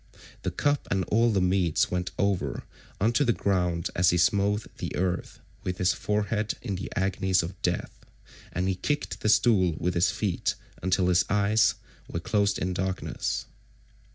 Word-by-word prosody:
The - - -1
cup 145 -1 0
and 95 -1 +1
all 115 +2 +4
the 100 -3 +2
meats 90 -3 +2
went 90 0 -1
over 100 -2 0 0.4
on 110 +4 +2
to 145 - +3
the 120 - +3
ground 90 -5 0
as 90 0 +4
he 90 - +2
smote 100 +4 +2
the - - -4
earth 90 -1 -2 0.3
with 90 -1 -3
his 90 +1 +2
forehead 105 +1 -1
in 100 - -3
the 95 +1 -5
agonies 95 -1 +1
of 90 +4 -7
death, 90 -3 -2 0.5
and 90 +1 -1
he 95 - +2
kicked 145 +11 -2
the 105 - +1
stool 95 -7 +4
with 90 +1 -1
his 85 +2 +3
feet 100 -5 -1 0.3
until 90 0 +2
his 90 0 +4
eyes 105 +2 +3 0.3
were 85 - -3
closed 100 +3 +1
in 90 +1 -2
darkness. 95 +1 -2
95 Hz, 170 wpm, -27 LUFS, 90-105 Hz, 0.5 s, all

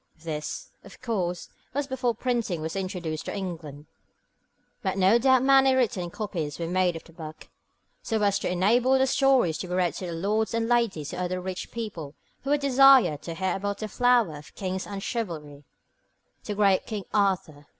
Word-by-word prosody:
This, 155 -2 -5
of - - -14
course, 185 -8 -2 0.3
was 285 0 0
before 255 -3 -1
printing 235 -7 -1
was 160 +3 -4
introduced 180 -5 -4
into - - -4
England, 160 -6 -6 1.0
but 190 -4 -2
no 195 +5 +5
doubt 260 0 +4
many 270 -1 +5
written 205 -9 0
copies 170 -7 -4
were 170 - -3
made 180 0 +1
of 165 - -7
the 165 - -18
book, 155 -2 -10 0.5
so 225 - -1
as 200 -1 +2
to - - -2
enable 235 +9 +3
the 265 - +3
stories 265 - +3
to 185 - -4
be 180 - -3
read 180 -2 +1
to 185 - -5
the 170 - -4
lords 210 +7 0
and 230 0 0
ladies 195 -10 0
and 180 - -4
other 180 0 -2
rich 185 0 -5
people 185 -11 -6 0.3
who 275 - -5
would 290 0 +2
desire 270 - +6
to 165 +3 -7
hear 190 +2 -1
about 200 +1 -3
the 215 - -4
flower 240 -7 +2
of 145 - -14
kings 190 -1 -4
and 200 -1 -6
chivalry, 155 - -5 0.8
the 210 - -3
great 200 -2 +3
King 210 -3 -4
Arthur. 185 -8 0
195 Hz, 185 wpm, -26 LUFS, 170-235 Hz, 1.0 s, desire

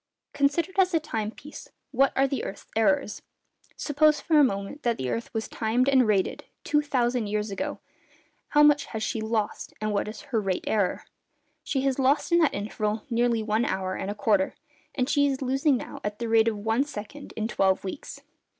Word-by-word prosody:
Considered 330 +7 +1
as 370 -2 +4
a - - +4
time 220 -9 -3
piece, 295 +6 -11 0.2
what 275 +1 +3
are 270 +1 +3
the 270 -2 -3
earth's 195 - -7
errors? 275 +1 +1 0.6
Suppose, 300 +1 +3
for 315 -2 +3
a - - +7
moment, 200 +3 -2
that 235 -4 0
the 130 -1 -2
earth 230 - -4
was 220 -1 -3
timed 235 +3 0
and 260 -4 +4
rated 200 -3 0 0.2
two 295 - +2
thousand 245 -5 0
years 210 0 -2
ago, 195 - -3 0.7
how 295 0 +4
much 295 -1 +5
has 220 -1 -5
she 220 0 -2
lost, 220 -1 -2
and 215 -1 -1
what 200 - 0
is 215 0 -7
her 225 -4 -1
'rate 190 -2 -1
error?' 205 -4 0 0.6
She 270 - -1
has 270 0 0
lost 275 +5 +2
in 340 - +5
that 320 -4 +3
interval 210 +1 -2
nearly 235 -1 +2
one 215 +2 +1
hour 190 -3 -1
and 190 - -4
a 205 - -3
quarter, 205 -2 +1 0.4
and 255 -2 0
she 285 0 +3
is 270 -1 -1
losing 270 +1 +2
now - - -8
at 210 0 -3
the 235 - -3
rate 225 0 +4
of 220 -2 0
one 225 +5 +1
second 285 +1 -8
in 220 0 -1
twelve 190 -4 +1
weeks. 195 +8 -7
235 Hz, 200 wpm, -26 LUFS, 210-280 Hz, 0.7 s, a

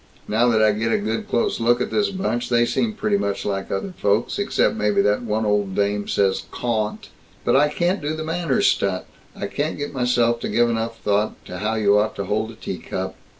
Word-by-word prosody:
Now 115 +3 +2
that 110 -2 +3
I 110 - +5
get 110 +2 -1
a - - +3
good 110 +2 -3
close 120 - 0
look 120 +1 +3
at - - -2
this 205 -1 +2
bunch, 155 - -2
they 120 -1 +4
seem 220 - 0
pretty 210 -1 0
much 100 - -2
like 95 -1 -2
other 180 - -3
folks, 105 - 0
except 200 - +2
maybe 210 -2 +1
that 105 +3 +2
one 110 -1 -1
old 105 -2 0
dame 100 0 0
says 95 -1 +1
'cawn't.' 110 -3 -2 0.4
But - - +3
I 145 +2 +5
can't 175 +5 0
do 150 +1 -2
the 160 - -4
manners 165 -4 0
stunt. 95 -2 +1 0.3
I - - -4
can't 145 +9 -2
get 145 0 -4
myself 120 -2 +2
to - - -4
give 120 0 +3
enough 115 0 -3
thought 105 +1 +1
to 90 - -7
how 110 +2 -1
you 105 -1 +4
ought 110 +1 0
to 100 - -3
hold 110 +3 -1
a 115 - -10
tea - - -6
cup." 95 0 -4
115 Hz, 225 wpm, -22 LUFS, 105-140 Hz, 0.4 s, I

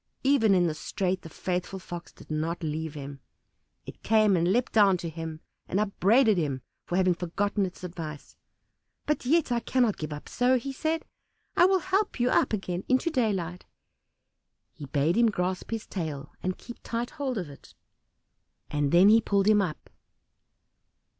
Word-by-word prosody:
Even 255 -7 +4
in 180 -1 +3
this 155 -3 -2
strait 185 -1 -2
the 165 - -10
faithful 180 +3 -3
Fox 175 -2 -8
did - - -14
not 160 +3 -2
leave 160 0 -3
him: 140 -1 -7 0.7
it - - -10
came 215 -2 +4
and 175 +1 +2
leapt 245 +4 +1
down 200 -4 +5
to 170 - -5
him, 160 0 -6 0.3
and 190 - 0
upbraided 215 +1 +3
him 140 -5 -2 0.2
for 175 - -2
having 185 -1 +3
forgotten 195 +4 -1
its 180 - -12
advice. 165 -4 -7 0.7
"But 300 -4 -1
yet 315 -1 +3
I 240 - +2
cannot 240 -3 +1
give 155 -1 -5
it - - -3
up 150 - -10
so," 250 +1 +2
he 270 +3 -5
said; 315 +4 -2 0.5
"I - - +6
will 380 +1 +4
help 380 -1 -1
you 245 +1 +2
up - - +3
again 190 -3 -2
into 260 +6 +2
daylight." 190 - -1 1.1
He 150 -4 -9
bade 145 +7 +1
him 235 -1 +5
grasp 185 -2 -2
his 225 -1 -3
tail 155 -6 -5
and 185 0 -2
keep 240 - -10
tight 235 +1 -3
hold 270 -5 -3
of 180 -5 -3
it; 140 -1 -14 1.0
and 145 -1 0
then 180 +3 +7
he 225 +2 +7
pulled 200 -2 +1
him 210 -1 +5
up. 170 -6 -4
190 Hz, 175 wpm, -28 LUFS, 165-235 Hz, 1.1 s, then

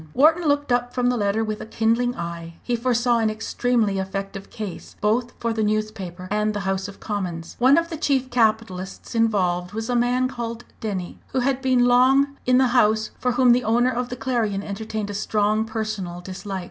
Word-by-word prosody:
Wharton 320 +5 +4
looked 290 -2 +1
up 245 0 0
from 250 -1 +2
the 250 - +1
letter 210 0 +1
with 215 -1 -3
a - - -6
kindling 230 +3 +1
eye. 170 -1 -6
He 245 - 0
foresaw 240 0 +2
an 220 -1 +2
extremely 220 -1 0
effective 195 +1 -5
case, 210 -6 -7
both 230 +3 +1
for 230 -1 -1
the 225 - -1
newspaper 210 -4 -2
and 210 0 0
the 205 - -2
House 195 0 -1
of 200 - -11
Commons. 180 -6 -4
One 260 +5 +6
of 335 0 +1
the 325 - -3
chief 265 -4 0
capitalists 220 -5 0
involved 190 -5 +1
was 225 +3 -3
a - - +1
man 245 +2 +2
called 235 -2 -5 0.2
Denny, 190 -5 -4
who 260 - +1
had 265 +1 0
been 255 -2 +3
long 265 +3 +4
in 250 0 +5
the 260 -1 +4
House, 220 -3 +3
for 250 -1 0
whom 250 0 +5
the 245 +1 +3
owner 240 +3 +3
of 245 0 -2
the 250 - -4
Clarion 225 -5 -1
entertained 210 0 -4
a - - -6
strong 215 +1 +1
personal 215 -6 -4
dislike. 190 +2 -6
225 Hz, 200 wpm, -23 LUFS, 200-245 Hz, 0.2 s, One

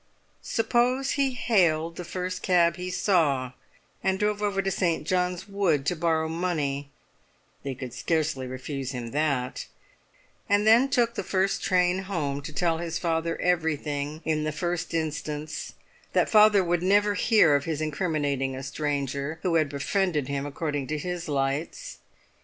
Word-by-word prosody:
Suppose 250 +4 +1
he 275 -2 +1
hailed 170 -9 +2
the 180 - -6
first 180 +1 -4
cab 170 -3 +3
he 180 0 -4
saw, 150 -10 +1 0.5
and 190 0 +1
drove 210 +1 0
over 200 -2 0
to 195 - 0
St. 170 -4 0
John's 180 +1 -1
Wood 185 -9 +1
to 175 - +1
borrow 160 -1 +1
money 155 -5 -2 0.7
(they 135 -2 -4
could 125 -2 -7
scarcely 155 -4 -1
refuse 130 +1 -5
him 120 -2 -5
that), 140 -4 -1 0.8
and 205 +1 +3
then 235 +5 +6
took 235 -3 +2
the - - -3
first 190 0 0
train 180 0 +2
home 145 -7 -2
to 140 - -7
tell 165 +1 0
his 170 -1 -3
father 165 -1 -1
everything 155 -3 -1
in 155 -1 0
the 155 - -1
first 175 +1 -3
instance, 155 -1 -4 0.4
that - - +2
father 210 -2 +6
would 175 -1 0
never 205 +3 +3
hear 200 -7 +4
of 140 - 0
his 160 -2 -2
incriminating 145 -4 -1
a 130 - -6
stranger 140 +1 -2
who 180 - +1
had 155 -3 +3
befriended 150 +1 0
him 140 0 -2
according 145 -1 -3
to 155 +2 -2
his 175 +2 -4
lights. 145 - -2
165 Hz, 155 wpm, -26 LUFS, 145-185 Hz, 0.8 s, then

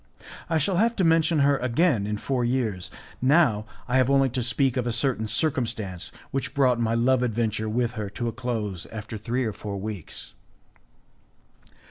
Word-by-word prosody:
I 165 - +2
shall 175 +4 +1
have 230 +4 +3
to 190 - +1
mention 165 -2 +3
her 140 0 +4
again 125 - +1
in 105 0 -2
four 125 +3 -1
years; 120 -7 -1 0.3
now 130 -6 +3 0.2
I 125 - +2
have 130 0 +3
only 135 -1 +4
to 125 +1 -2
speak 130 +2 +1
of 125 -2 -1
a - - +1
certain 115 -2 0
circumstance 110 - -1 0.2
which 135 - -2
brought 130 -4 +3
my 115 0 +1
love 125 +2 +3
adventure 110 -2 -1
with 120 +1 0
her 105 -4 -4
to 120 +4 -4
a - - -1
close 105 -7 -3
after 110 +1 -7
three 120 +4 -2
or 110 - -2
four 100 -1 -6
weeks. 100 -4 -6
120 Hz, 175 wpm, -25 LUFS, 110-135 Hz, 0.3 s, her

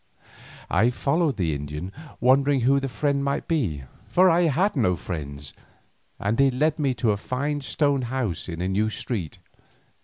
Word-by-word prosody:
I 110 +7 +3
followed 140 - 0
the 85 -5 0
Indian, 75 +5 -5 0.3
wondering 135 +1 +3
who 135 +3 +4
the 135 0 -3
friend 140 +4 0
might 140 0 -2
be, 105 - -1 0.2
for 180 - +5
I 170 +1 +3
had 175 +7 +1
no 110 -9 +2
friends, 70 -4 -6 0.7
and 105 +4 -1
he 135 0 +6
led 150 +5 0
me 135 -4 +1
to 115 -3 +1
a 100 - 0
fine 145 +7 -2
stone 140 0 +1
house 120 -9 -3
in 85 0 -5
a 90 - 0
new 105 +3 +1
street. 105 - -4
125 Hz, 165 wpm, -25 LUFS, 95-140 Hz, 0.7 s, he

